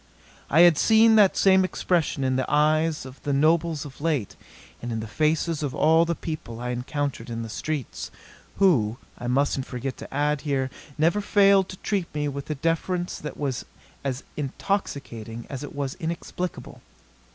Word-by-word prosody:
I 160 - +5
had 175 -4 +7
seen 220 0 +6
that 200 -3 +5
same 190 -1 +5
expression 175 -6 0
in 130 -1 +1
the 130 0 -1
eyes 155 0 +2
of 130 +1 -11
the 145 - -2
nobles 155 +1 +2
of 140 -1 -11
late, 140 -12 -1 0.5
and 120 - -4
in 115 - -2
the 110 - -4
faces 155 +6 0
of 145 -4 -3
all 160 +2 +4
the 170 0 -1
people 150 -9 -6
I 125 0 -3
encountered 125 0 -3
in 115 0 -4
the 115 - -7
streets 150 +4 -4 0.5
who, 120 - +3 0.2
I 120 - -5
mustn't 135 +1 +1
forget 130 +1 -4
to - - -10
add 145 +1 0
here, 135 -3 -1 0.3
never 170 +7 +2
failed 200 -2 +4
to 185 - -8
treat 195 -4 -1
me 150 0 0
with 140 0 -5
a 155 - -1
deference 170 +4 -1
that 150 - -7
was 135 -5 -2 0.4
as 135 -1 -3
intoxicating 135 - -3
as 135 0 -5
it 145 - -8
was 140 -2 -2
inexplicable. 170 +2 -5
150 Hz, 175 wpm, -25 LUFS, 130-170 Hz, 0.5 s, had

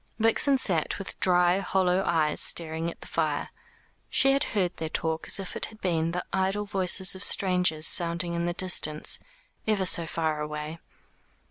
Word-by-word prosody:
Vixen 225 +5 +3
sat 175 -11 +1
with 195 - -8
dry 180 0 +3
hollow 190 -1 0
eyes 160 -3 +2
staring 165 0 +2
at - - -12
the - - -11
fire. 155 -3 -2 0.6
She 270 - +3
had 275 +2 +1
heard 185 -3 -1
their 160 - -5
talk 160 0 -3
as - - +4
if 195 - -7
it - - 0
had 220 - -16
been 165 -4 -1
the 175 +1 -4
idle 195 +2 -1
voices 190 -1 +2
of 190 0 -6
strangers 180 -5 +2
sounding 170 +1 0
in 170 0 -2
the 175 - -2
distance, 170 -4 +1 0.5
ever 205 -3 0
so 170 -2 +3
far 155 -2 -2
away. 150 +2 -6
175 Hz, 170 wpm, -26 LUFS, 160-190 Hz, 0.6 s, as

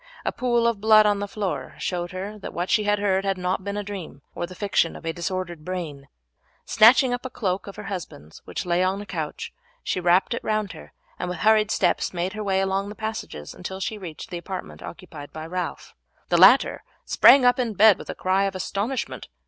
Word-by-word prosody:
A - - +1
pool 240 -2 +1
of 230 -4 +1
blood 215 0 +6
on 205 -1 +2
the 205 - -3
floor 200 -2 -4
showed 175 -1 -3
her 200 +3 -6
that - - -8
what 175 +2 -2
she 210 - +3
had 205 0 +2
heard 195 -2 +1
had 195 -1 0
not 180 +1 -2
been 200 +1 -4
a 205 - -2
dream 185 -9 -8
or 175 - -4
the 185 - -11
fiction 200 -5 +1
of - - -11
a 165 - -1
disordered 175 -1 -4
brain. 155 -6 -5 0.6
Snatching 245 +3 +6
up 245 - -3
a 255 - -5
cloak 190 -5 -2
of 200 - -8
her - - -8
husband's 170 - -8
which - - -5
lay 175 0 +1
on 190 +2 0
a 205 - -7
couch, - - -5 0.3
she - - -1
wrapped 180 +5 +3
it 235 - -4
round 215 -3 -1
her, 160 - -12 0.3
and 180 - -3
with 180 - -4
hurried 215 -1 +4
steps 190 - 0
made 175 +2 -2
her 215 0 -5
way 190 -1 +1
along 195 +1 -1
the 210 - -8
passages 220 - -6
until 190 +1 -7
she 210 +2 -3
reached 170 -4 -9
the 175 - -4
apartment 185 +2 -7
occupied 160 -5 -10
by 155 0 -7
Ralph. 180 +2 -5 0.4
The - - +3
latter - - +6 0.2
sprang 265 -2 +6
up 245 +1 +4
in 235 -4 -1
bed 210 0 +6
with - - -10
a - - -4
cry 190 +1 +1
of 195 -1 -3
astonishment. 195 - -3
195 Hz, 220 wpm, -24 LUFS, 180-215 Hz, 0.6 s, blood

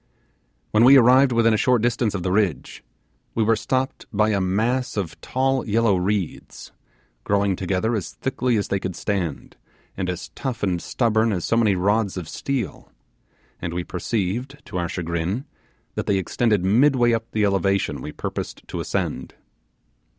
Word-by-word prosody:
When 110 +2 +4
we 135 +3 +9
arrived 130 +2 +6
within 115 -1 +3
a - - +3
short 125 -3 +3
distance 120 -3 +1
of 90 - -3
the 90 - -1
ridge, 95 -5 -1 0.5
we 115 - +2
were 115 +1 +3
stopped 130 +3 -2
by 105 0 +2
a 100 -2 +1
mass 110 +7 0
of 90 -6 -4
tall 135 0 0
yellow 110 -1 +3
reeds, 95 -1 -3 0.5
growing 100 -1 +1
together 95 +5 -1
as 105 -6 -3
thickly 130 -2 -1
as 100 - -2
they 100 - 0
could 95 -2 -4
stand, 90 -8 -3 0.4
and 95 -1 -2
as 90 -1 -5
tough 125 -4 -5
and 90 -4 0
stubborn 115 -2 +1
as 90 -5 -2
so - - +1
many 110 -4 +3
rods 100 +2 +1
of 90 -4 -5
steel; 135 +7 -4 0.7
and 85 0 -4
we 90 - -1
perceived, 115 - -3
to 90 - -4
our 85 -1 -2
chagrin, 85 - -2 0.5
that - - -4
they 100 - +2
extended 100 +1 +1
midway 120 +3 +4
up 115 0 -2
the 110 -1 +1
elevation 100 0 0
we - - -6
proposed - - -6
to - - -4
ascend. - - -3
105 Hz, 165 wpm, -23 LUFS, 95-120 Hz, 0.7 s, we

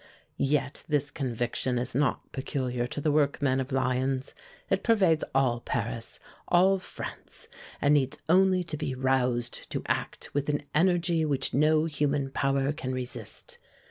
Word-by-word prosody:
Yet 140 0 0
this 145 -2 0
conviction 125 -2 -1
is 125 +1 -2
not 140 +3 0
peculiar 125 -2 -2
to 145 - -5
the 150 +1 +1
workmen 145 -2 +2
of 130 +1 -3
Lyons. 130 0 0 0.3
It 195 0 +1
pervades 190 -9 +3
all 130 -3 +3
Paris, 115 -1 -4 0.3
all 190 +2 +4
France, - - -9 0.3
and 145 - +4
needs 135 -3 +2
only 185 +2 +4
to 165 -3 -5
be 130 - -3
roused 125 -2 0
to - - -3
act - - -3
with 145 +1 -1
an 145 0 0
energy 170 0 +2
which 140 -3 0
no 155 +2 +4
human 145 -3 0
power 135 0 +1
can 130 -3 -4
resist. 130 - -7
140 Hz, 145 wpm, -28 LUFS, 130-155 Hz, 0.3 s, all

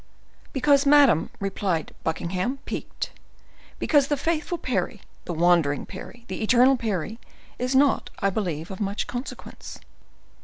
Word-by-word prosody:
"Because, 280 +1 +3
madam," 280 - +6
replied 190 -4 -2
Buckingham, 180 - -1
piqued, - - -5 0.7
"because 290 -3 +3
the 290 - 0
faithful 335 +4 -1
Parry, 200 - -2 0.2
the - - -4
wandering 165 -4 +3
Parry, 240 -1 -10
the 190 - -5
eternal 250 +4 +5
Parry, 220 -2 -3 0.4
is 255 +2 0
not, 275 +1 +3
I 200 -6 +1
believe, 175 -4 -3
of 190 - -7
much 200 0 -1
consequence." 245 +3 -7
225 Hz, 125 wpm, -25 LUFS, 180-270 Hz, 0.7 s, madam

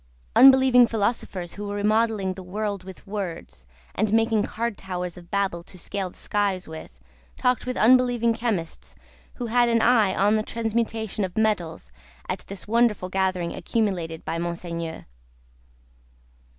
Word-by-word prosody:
Unbelieving 260 -2 +7
Philosophers 205 -5 -2
who 205 0 -6
were 205 - -4
remodelling 210 -2 +1
the 190 - -9
world 200 +1 -3
with 190 0 -12
words, 175 - -6 0.3
and 215 0 0
making 225 -1 +3
card 235 +1 -2
towers 180 -3 -5
of 175 -1 -13
Babel 195 -4 -1
to 185 - -11
scale 190 +1 -3
the - - -20
skies 200 -3 -1
with, 160 - -10 0.4
talked 250 0 +1
with 255 - -2
Unbelieving 245 -1 +4
Chemists 220 -8 -3 0.4
who 245 - -4
had 240 +1 +3
an 230 0 +3
eye 220 -6 +4
on 205 +2 +3
the - - +1
transmutation 225 -1 -2
of 185 +1 -4
metals, 175 - -1 0.4
at - - -2
this 195 0 -7
wonderful 225 -4 +2
gathering 185 -2 -1
accumulated 180 -8 -2
by 165 - -2
Monseigneur. 170 -1 -5
205 Hz, 145 wpm, -25 LUFS, 180-225 Hz, 0.4 s, Unbelieving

